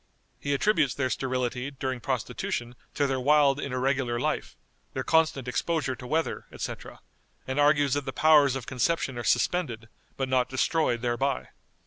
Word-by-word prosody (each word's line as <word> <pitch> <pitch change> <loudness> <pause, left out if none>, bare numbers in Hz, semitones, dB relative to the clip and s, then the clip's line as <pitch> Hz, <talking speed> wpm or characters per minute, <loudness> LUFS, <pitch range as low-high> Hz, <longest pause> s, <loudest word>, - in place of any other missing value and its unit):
He 140 0 -1
attributes 155 -5 +2
their 130 -2 -1
sterility 125 0 -2
during 130 -2 -4
prostitution 120 +1 -3 0.2
to 145 - +2
their 135 -1 0
wild 145 +1 +4
and 140 - -4
irregular 130 -2 0
life, - - -2 0.4
their - - -2
constant 160 -5 +2
exposure 140 0 -1
to 125 +1 -10
weather, 160 +5 -1
etc., - - -7 0.4
and 130 +2 -2
argues 145 -2 +4
that 145 -1 -1
the 135 - -3
powers 145 -3 +5
of 135 -3 -5
conception 130 +1 0
are - - -4
suspended, 120 -4 0 0.3
but 135 - -1
not 130 -1 +1
destroyed 130 -2 +1
thereby. 125 +3 -1
135 Hz, 155 wpm, -27 LUFS, 125-145 Hz, 0.4 s, powers